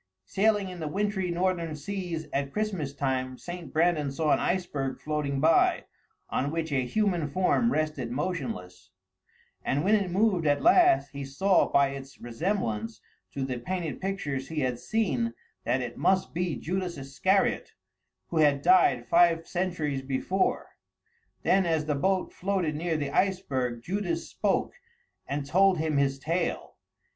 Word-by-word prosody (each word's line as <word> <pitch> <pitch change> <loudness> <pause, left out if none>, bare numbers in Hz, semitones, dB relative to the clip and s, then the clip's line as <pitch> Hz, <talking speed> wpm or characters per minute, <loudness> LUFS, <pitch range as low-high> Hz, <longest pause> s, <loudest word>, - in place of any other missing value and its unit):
Sailing 205 -1 +1
in 180 -1 -8
the 160 - -3
wintry 195 +2 -1
northern 170 -2 -1
seas 175 -1 -4
at 140 0 -1
Christmas 190 -7 -2
time, 130 -2 -2
St. 175 0 -8
Brandan 155 -3 +2
saw 150 +2 0
an - - +4
iceberg 150 -8 -2
floating 150 -2 -2
by, 160 +3 +3 0.5
on 140 - 0
which 160 0 -3
a 130 -3 0
human 180 - 0
form 185 - +2
rested 155 - -1
motionless; 115 - -4 0.7
and 145 +2 0
when 200 +4 +3
it 200 -4 +2
moved 185 -3 +2
at 145 - +2
last, 355 0 +5
he 140 -1 -6
saw 180 +8 +2
by 140 -1 +4
its 135 0 -9
resemblance 115 - -2 0.3
to 135 -1 -3
the 130 -2 -3
painted 170 +3 -4
pictures 145 -9 -3
he 160 -2 -3
had 125 -2 -1
seen 130 - -1 0.3
that 125 +2 +1
it 120 -1 -6
must 190 0 +2
be 175 -2 -1
Judas 180 +6 -3
Iscariot, 140 +9 0 0.6
who 170 - -3
had 145 -2 +3
died 170 -9 +4
five 170 +4 +4
centuries 170 -7 -2
before. 135 +8 -1 0.7
Then 190 -2 +3
as 160 -2 +1
the 150 - 0
boat 185 +6 0
floated 185 -5 -1
near 165 +1 -1
the 145 -2 -3
iceberg, 130 -12 0
Judas 175 -2 -2
spoke - - 0 0.5
and 140 0 -3
told 190 +5 +4
him 155 -2 0
his 135 -1 +2
tale. 165 +5 -2
160 Hz, 150 wpm, -28 LUFS, 135-185 Hz, 0.7 s, last